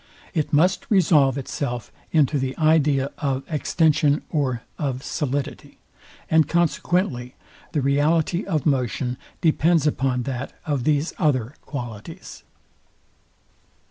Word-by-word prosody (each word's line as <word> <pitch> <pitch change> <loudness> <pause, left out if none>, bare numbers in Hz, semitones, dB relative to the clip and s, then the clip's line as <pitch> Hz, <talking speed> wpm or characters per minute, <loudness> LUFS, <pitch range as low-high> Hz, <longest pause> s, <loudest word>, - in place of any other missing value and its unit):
It 155 -5 -1
must 180 +5 +2
resolve 150 - +4
itself 125 -3 -4 0.2
into 150 -2 +3
the 130 0 -3
idea 150 -3 +3
of 135 -2 -1
extension 155 -1 +2
or 130 -6 -1 0.2
of 135 -3 -2
solidity; 145 -1 -3 0.5
and 160 -1 +4
consequently 170 -6 0 0.4
the 150 - +1
reality 155 +6 +2
of 160 -7 -1
motion 125 -3 0 0.2
depends 165 -1 +3
upon 130 -4 0
that 130 0 -4
of 140 -5 -1
these 150 +1 +1
other 130 -6 +1
qualities. 120 -7 -8
145 Hz, 110 wpm, -23 LUFS, 130-160 Hz, 0.5 s, resolve